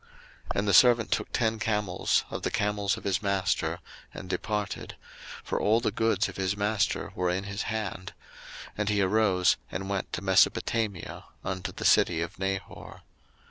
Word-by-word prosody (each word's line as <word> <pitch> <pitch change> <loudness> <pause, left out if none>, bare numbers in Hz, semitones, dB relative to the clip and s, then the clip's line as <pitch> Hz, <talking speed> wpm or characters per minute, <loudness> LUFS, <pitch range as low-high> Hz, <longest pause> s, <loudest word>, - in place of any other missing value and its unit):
01:024:010 470 - -27 0.5
And 100 +1 0
the 100 - +2
servant 120 +2 +6
took - - -1
ten 110 -2 0
camels 105 -4 0
of - - -4
the - - -1
camels 105 -1 0
of - - -10
his 100 -2 0
master, 100 -2 0 0.3
and 95 - -9
departed; 105 +3 -3 0.5
for - - -2
all 110 +2 +3
the 120 - -1
goods 110 -2 +1
of - - -9
his 95 +1 -1
master 105 -1 0
were 90 -1 0
in 90 +2 -1
his 100 +1 -4
hand: 100 -3 -4 0.6
and 105 0 -1
he 105 -1 +2
arose, 95 -2 +3
and 95 +1 -4
went 100 -1 -2
to - - -3
Mesopotamia, 100 +1 +1 0.2
unto 95 -1 -3
the - - -6
city 85 -2 +4
of 85 +3 -5
Nahor. 95 0 -5
100 Hz, 170 wpm, -28 LUFS, 95-110 Hz, 0.6 s, servant